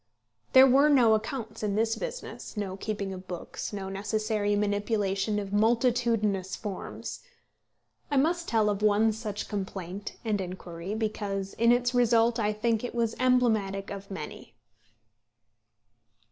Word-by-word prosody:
There 260 -1 +10
were 275 +3 +5
no 245 -6 +6
accounts 220 0 -3
in 205 -2 -1
this 225 +1 +1
business, - - -7
no 195 -2 -3
keeping 200 -1 -4
of 185 0 -9
books, 175 -2 -6
no 195 -2 -5
necessary 205 +1 -1
manipulation 205 0 0
of 200 -1 -4
multitudinous 225 -3 +2
forms. 205 -4 -6 0.9
I 285 - +1
must 335 +5 +1
tell 215 -2 +2
of 205 0 -3
one 215 +1 +4
such 210 -2 -5
complaint 195 -1 -5
and 210 -3 0
inquiry, 180 +1 -6
because 205 -3 -3
in 235 +1 +3
its 245 0 +2
result 235 -1 +3
I 210 -1 +1
think 220 +1 0
it 245 - -5
was 230 -1 +1
emblematic 220 -6 +2
of 200 0 -7
many. 195 - -8
215 Hz, 135 wpm, -28 LUFS, 200-235 Hz, 0.9 s, There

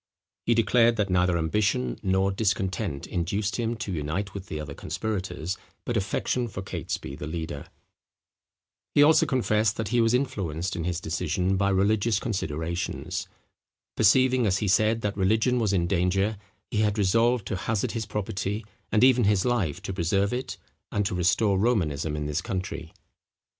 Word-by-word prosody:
He 115 - +4
declared 115 +1 +4
that 105 -3 0
neither 90 -1 +3
ambition 80 - 0
nor 95 +1 +2
discontent 95 -5 -1
induced 100 +5 -2
him 120 -1 -1
to 105 -3 -5
unite 85 +5 -3
with 100 -1 -7
the 75 - -5
other 75 -2 -6
conspirators, 95 -2 -4 0.3
but 120 - -2
affection 115 +4 0
for 95 -3 -6
Catesby 70 -6 -5
the 75 - -6
leader. 80 -2 -5 1.3
He 145 - +7
also 155 +2 +5
confessed 110 -4 +1
that 110 -3 -2
he 120 +1 +3
was 115 +1 +3
influenced 95 - -2
in 85 - -3
his 85 -1 -1
decision 85 +4 0
by 100 +1 +2
religious 100 +2 +2
considerations. 85 - -3 0.7
Perceiving, 130 +1 +4
as 95 -1 +2
he 105 - -1
said, 110 +4 +3
that 105 -2 -2
religion 110 +6 +2
was 110 -4 +1
in 90 -4 +2
danger, 95 +3 +1 0.3
he - - -2
had 105 -1 +1
resolved 115 +3 +2
to 100 - -2
hazard 100 +3 -1
his 110 -3 -4
property, 105 0 -3 0.3
and 110 - +3
even 125 -3 +5
his 100 -2 +2
life, 100 -8 0
to 95 - -4
preserve 95 +4 +1
it, 125 +1 -4 0.3
and 105 - 0
to - - -1
restore 95 +3 +2
Romanism 80 -9 0
in 75 -1 -3
this 75 +3 -1
country. 90 -4 -4
100 Hz, 165 wpm, -26 LUFS, 90-110 Hz, 1.3 s, He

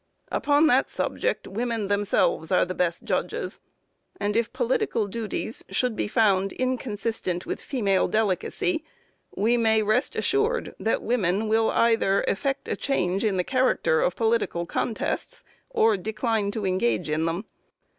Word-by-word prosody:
Upon 290 +2 +3
that 265 -2 +3
subject, - - -2
women 225 0 -2
themselves 200 -5 +1
are 185 - +4
the 180 - -4
best 175 -2 -1
judges, - - -2 0.6
and 205 +1 -1
if 230 0 +1
political 460 - 0
duties 220 +1 -4
should 250 -3 0
be - - -1
found 200 -4 +2
inconsistent 225 -7 -2
with - - -4
female 200 -8 +1
delicacy, 255 - 0 0.5
we 230 +4 +2
may 220 -2 +3
rest 215 +6 +1
assured 445 +4 0
that 225 - 0
women 210 -3 +1
will 220 +1 +3
either 225 -4 +2
effect 270 +7 -1
a - - -1
change 190 -8 0
in 205 -4 +1
the 180 - +2
character 255 -9 +2
of 180 - +1
political 225 -6 0
contests, 220 +6 -3 0.3
or 225 - +3
decline 215 +1 -1
to 205 0 -3
engage 155 - 0
in 155 +1 0
them. 170 +6 -2
220 Hz, 145 wpm, -25 LUFS, 195-245 Hz, 0.6 s, are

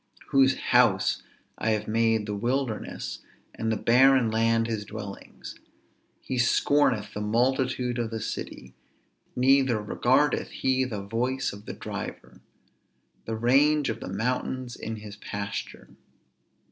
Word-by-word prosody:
whose 135 -1 +4
house - - +3 0.4
I 110 - 0
have 105 - -2
made 115 -1 +2
the 105 - -3
wilderness 120 +2 -2 0.3
and 115 0 -2
the 110 - 0
barren 130 -1 +4
land 115 +1 +2
his 110 -2 -3
dwellings. 105 -2 -9 0.6
He 130 - -3
scorneth 120 -4 +2
the 105 - -4
multitude 125 +2 0
of 115 -1 -1
the 110 0 -4
city, 110 - -6 0.6
neither 130 -2 +3
regardeth 105 - +1
he 130 0 0
the 105 -6 -5
voice 125 +6 -1
of 100 +1 -12
the - - -4
driver. - - -7 0.8
The 115 - -3
range 140 +5 +3
of - - -3
the - - -7
mountains 125 +4 -2
is 110 0 -5
his 105 -1 -8
pasture. 100 -1 -6
115 Hz, 130 wpm, -27 LUFS, 110-130 Hz, 0.8 s, whose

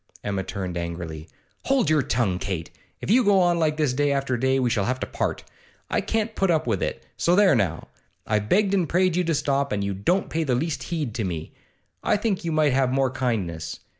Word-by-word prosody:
Emma 100 -2 -1
turned 95 -2 -4
angrily. 85 -2 -6 0.4
'Hold 270 - +2
your 155 -1 +4
tongue, 115 -8 0
Kate! 95 -5 -4 0.3
If - - -2
you 250 +3 +5
go 200 -2 +4
on 175 -2 +3
like 155 -2 +1
this 150 -5 +1
day 145 +2 +1
after 135 -2 0
day 130 +2 +1
we 130 -2 +1
shall 105 -5 +1
have 130 +1 -1
to - - 0
part; - - -3 0.5
I - - +2
can't 225 0 -1
put 195 -3 +1
up 160 -2 +2
with 110 -6 0
it, 65 - -3
so 175 - +3
there 195 -3 +5
now! 95 - 0 0.4
I've 105 0 0
begged 200 0 +3
and 180 -6 +1
prayed 185 0 +2
you 180 - +2
to 165 -2 0
stop, 140 0 0
and 100 -1 -1
you 100 0 -1
don't 175 - 0
pay 165 0 0
the 130 -5 +1
least 155 +4 -2
heed 150 -9 -3
to 115 - -2
me; 85 -4 -4 0.5
I - - +2
think 205 -3 -1
you 165 - -2
might 155 -3 +3
have 130 -1 +2
more 135 -1 +1
kindness. 90 -12 -2
135 Hz, 225 wpm, -24 LUFS, -, 0.5 s, you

